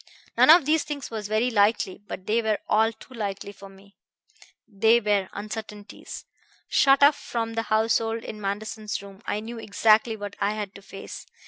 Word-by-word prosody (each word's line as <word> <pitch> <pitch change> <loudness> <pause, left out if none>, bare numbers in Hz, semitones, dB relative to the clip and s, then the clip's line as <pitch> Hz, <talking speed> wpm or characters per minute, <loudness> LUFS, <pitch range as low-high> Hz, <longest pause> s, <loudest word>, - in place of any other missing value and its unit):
None - - +5
of 325 -2 +8
these 310 +1 +2
things 290 -4 -6
was 215 -2 -4
very 220 +4 +1
likely; 205 -3 +2
but 185 - -7
they 225 +3 +1
were 215 -2 0
all 220 +1 +3
too 245 +3 -16
likely 200 -3 -5
for 195 0 -13
me. 195 +1 -19 0.7
They 225 +2 +3
were 205 -3 0
uncertainties. 210 0 -8 0.4
Shut 275 0 +4
off 290 +1 +7
from 225 -4 -4
the 225 - -1
household 225 +1 +1
in 215 - -8
Manderson's 210 +1 -4
room 195 0 -13
I 210 - -2
knew 230 +1 -7
exactly 220 +1 +3
what 205 -1 -7
I 200 +1 0
had 205 -2 -5
to 200 - -12
face. 195 0 -10
215 Hz, 180 wpm, -25 LUFS, 205-230 Hz, 0.7 s, of